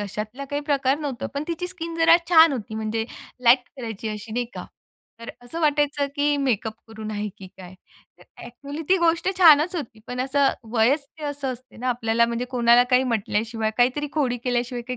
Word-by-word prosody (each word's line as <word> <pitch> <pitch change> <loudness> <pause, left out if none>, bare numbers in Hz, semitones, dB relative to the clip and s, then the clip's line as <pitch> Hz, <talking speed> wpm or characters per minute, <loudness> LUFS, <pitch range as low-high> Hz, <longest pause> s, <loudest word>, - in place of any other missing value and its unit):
अशातला 215 +6 -5
काही 290 0 -1
प्रकार 275 -1 +1
नव्हता. 280 -6 -4
पण 280 - -2
तिची 340 +1 -3
स्किन 335 -2 -6
जरा 330 0 +7
छान 325 -3 +7
होती 225 -4 -5
म्हणजे 220 +1 -2 0.4
लाईट 240 +3 +7 0.2
कलरची 225 -4 -5
अशी 215 +1 -7
नाही 245 +1 -1
का. - - -6 0.6
तर 230 - -9
असं 325 +8 -7
वाटायचं, 290 -1 +1
की 290 0 +2
मेकअप 230 -6 -1 0.2
करून 220 -1 -7
आहे 210 0 -3
की 190 - -10
काय. 185 0 -11 0.4
तर - - -17 0.2
अ‍ॅक्चुअली 280 +6 -8
ती 380 - +5
गोष्ट 335 +1 +2
छानच 330 0 +6
होती 230 -8 -7
पण 250 0 -4
असं 275 +1 +2 0.3
वयच 260 +6 +2
ते 305 - -7
असं 285 -2 -3
असते 255 +1 -14
ना 250 +2 -3
आपल्याला 235 -1 +1
म्हणजे 235 +1 -2
कोणाला 240 -1 +5
काही 250 0 +5
म्हटल्याशिवाय, 225 -1 -1
काहीतरी 260 +4 +1
खोडी 260 -6 0
केल्याशिवाय 245 0 -1
काही 250 - -3
250 Hz, 190 wpm, -23 LUFS, 230-290 Hz, 0.6 s, जरा